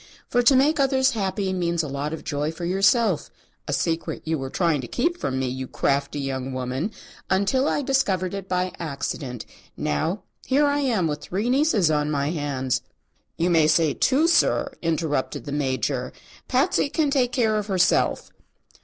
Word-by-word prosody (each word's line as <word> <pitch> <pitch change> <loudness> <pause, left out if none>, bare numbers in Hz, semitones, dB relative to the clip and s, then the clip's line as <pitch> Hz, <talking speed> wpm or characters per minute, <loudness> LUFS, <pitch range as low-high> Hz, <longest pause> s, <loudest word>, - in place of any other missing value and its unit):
For 245 - +4
to 255 +3 +5
make 290 +4 +3
others 265 -1 +3
happy 195 -2 -1
means 170 -2 0
a - - -4
lot 140 +2 -3
of 160 - -6
joy 145 +2 -2
for 170 +1 -6
yourself 195 - +2 0.4
a - - -2
secret 165 +4 -1
you 160 -1 -1
were 135 0 -4
trying 165 -2 +1
to 120 - -7
keep 345 - -1
from 130 - -2
me, 130 0 -1
you 130 +1 -4
crafty 140 +2 -1
young 135 -1 -3
woman, 130 - -2 0.4
until 200 +9 +2
I 290 - 0
discovered 200 -10 +1
it 195 -1 -6
by 180 0 0
accident. 140 -5 -4 0.3
Now, 165 - -1 0.2
here 280 +3 +3
I 285 0 +1
am 235 -10 +1
with 150 -1 -2
three 205 +10 -2
nieces 255 - +3
on 150 -1 +1
my 145 0 0
hands 140 -5 -1 0.3
" - - -43 0.2
"You 170 +2 +1
may 160 -2 +4
say 160 -1 +3
two, 285 +5 +2
sir," 345 0 +2
interrupted 160 -5 -1
the 145 - -5
Major. 130 -2 -1 0.3
"Patsy 270 +2 +2
can 300 -1 0
take 255 -3 +2
care 225 -5 +1
of 210 -1 -3
herself." 185 -3 +1
170 Hz, 180 wpm, -24 LUFS, 145-240 Hz, 0.4 s, to